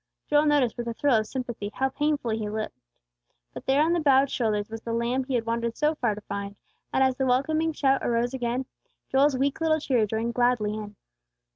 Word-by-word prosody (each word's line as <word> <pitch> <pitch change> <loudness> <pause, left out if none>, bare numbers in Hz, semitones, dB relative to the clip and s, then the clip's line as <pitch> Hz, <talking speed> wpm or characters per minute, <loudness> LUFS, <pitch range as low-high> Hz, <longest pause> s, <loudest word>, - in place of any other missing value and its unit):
Joel 295 +1 +3
noticed, 285 -6 +2
with 240 0 -4
a 230 - -3
thrill 280 -1 +2
of 215 0 -1
sympathy, 240 -5 -4
how 265 0 +1
painfully 275 -6 -1
he 210 -1 -3
limped. 215 +1 -4 0.8
But - - -9
there 275 +3 +4
on 330 +2 +2
the 345 - +2
bowed 275 -3 +4
shoulders 210 -4 0
was 225 0 -7
the 230 - -4
lamb 240 +3 0
he 260 -1 -2
had 230 -2 0
wandered 230 0 -2
so 300 +1 +2
far 235 -8 -1
to 210 - -9
find; 200 0 -5 0.4
and 265 - +3
as 260 -1 +2
the 265 - 0
welcoming 310 +6 +1
shout 275 -3 +1
arose 240 +1 0
again, 250 0 -2 0.5
Joel's 270 0 +3
weak 275 +4 0
little 315 -1 +2
cheer 245 -7 +1
joined 225 +3 -2
gladly 240 -4 +1
in. 210 -1 -7
250 Hz, 215 wpm, -26 LUFS, 225-275 Hz, 0.8 s, there